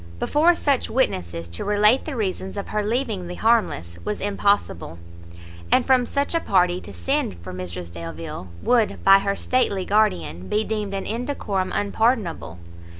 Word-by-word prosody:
Before 325 +4 +3
such 280 -5 +1
witnesses 85 - -1
to 85 - -4
relate 210 +4 +3
the 310 - -4
reasons 190 -3 -3
of 200 - -5
her 210 - 0
leaving 215 -4 -2
the 180 - -6
Harmless 85 - +1
was 210 - -3
impossible; 200 - 0 0.7
and 255 - +4
from 255 -2 +3
such 280 +3 -1
a 335 - +2
party 180 - +2
to 100 - -10
send 85 +1 -1
for 90 - -7
Mrs 90 -1 -6
Delvile, 85 +1 -7
would, 235 -3 +2
by 195 0 +8
her 200 0 -1
stately 200 -8 0
guardian, 90 - +1
be 215 - +1
deemed 210 -2 -3
an 195 - -3
indecorum 220 -5 -2
unpardonable. 205 - 0
200 Hz, 155 wpm, -23 LUFS, -, 0.7 s, by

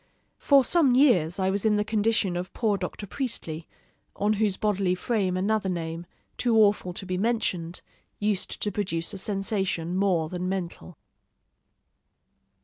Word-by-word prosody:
For 280 -2 +5
some 275 -3 +3
years 210 - +4
I 190 -1 +1
was 200 0 -1
in 215 -1 +3
the 210 - +1
condition 215 -3 +1
of 180 +1 -4
poor 220 -4 +1
Dr. 205 - -5
Priestley, 180 - -4 0.5
on 210 +1 +1
whose 205 -3 +2
bodily 195 -3 +1
frame 190 -3 -1
another 200 +1 0
name, 165 -1 -4 0.3
too 235 -2 +2
awful 205 -4 +3
to 190 - -5
be 185 -1 -2
mentioned, 185 -6 -1 0.3
used 205 -2 -1
to 210 - 0
produce 180 -3 -2
a 195 - -5
sensation 195 -4 -1
more 185 -5 +1
than 180 +2 -3
mental. 180 -3 -5
195 Hz, 145 wpm, -26 LUFS, 180-215 Hz, 0.5 s, For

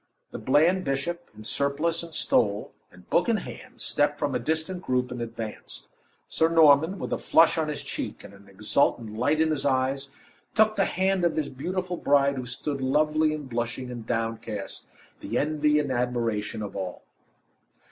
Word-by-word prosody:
The - - -6
bland 170 +7 +3
bishop, 145 +6 -3
in 110 - -10
surplice 145 +8 +1
and 170 0 -9
stole, 105 -8 +1 0.2
and 90 0 -18
book 175 - +3
in 230 - +3
hand, 255 +4 -9
stepped 145 0 +1
from 145 -2 -1
a - - 0
distant 160 +7 -2
group, 125 -4 -1
and 125 -1 -5
advanced. 115 -2 -7 0.4
Sir 160 - +2
Norman, 160 +2 +5
with - - -4
a - - -1
flush 165 0 +5
on 160 -1 0
his 150 -1 -4
cheek, - - -5
and - - -12
an 100 0 -17
exultant 105 +2 0
light 145 +7 +1
in 160 0 +3
his 145 -3 -1
eyes, 135 0 0 0.5
took 215 0 +4
the 195 - +2
hand 190 0 +1
of 170 - +2
his 155 -2 -1
beautiful 180 +6 -3
bride 140 -2 +3
who 125 -1 -4
stood 135 +3 -4
lovely, 150 +3 +2
and 150 -2 -5
blushing, 120 +1 -3
and 120 -2 -8
downcast, 115 -3 -4 0.3
the - - -3
envy 150 0 +2
and 145 -2 0
admiration 115 -4 -1
of 100 - -7
all. 95 -2 -5
140 Hz, 175 wpm, -26 LUFS, 120-160 Hz, 0.5 s, Norman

